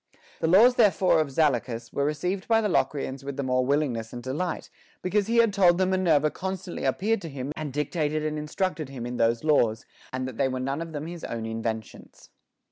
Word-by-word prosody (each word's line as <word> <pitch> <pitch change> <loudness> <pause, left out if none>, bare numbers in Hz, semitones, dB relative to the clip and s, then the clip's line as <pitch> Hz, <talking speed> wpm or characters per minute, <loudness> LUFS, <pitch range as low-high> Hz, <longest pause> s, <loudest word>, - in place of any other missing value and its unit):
The - - 0
laws 225 +9 +6
therefore 195 -6 +4
of 155 - -2
Zaleucus 125 -5 0
were 140 0 +1
reeeived 180 +6 -2
by 225 -1 +4
the 220 - +1
Locrians 140 -7 -1
with 140 0 -6
the 140 - -1
more 130 -1 +1
willingness 125 -5 0
and 120 0 -7
delight, 155 +7 -3 0.3
because 200 +2 +1
he 230 +1 +1
had 230 -3 +5
told 180 -3 +5
them 185 0 +1
Minerva 160 -5 +3
constantly 190 -1 -5
appeared 220 +2 +1
to 165 - -6
him 135 0 -5
and 155 -3 -4
dictated 150 +2 -1
and 155 0 -2
instructed 155 0 -2
him 130 -3 -6
in 120 0 -4
those 115 +2 +2
laws, 115 -8 +2 0.3
and 130 0 -3
that 130 - -8
they 135 - +2
were 130 -1 -3
none 135 +4 -2
of 165 -1 -6
them 150 0 -4
his 170 0 -8
own 115 -1 -4
inventions. 110 -1 -6
150 Hz, 210 wpm, -26 LUFS, 130-180 Hz, 0.3 s, laws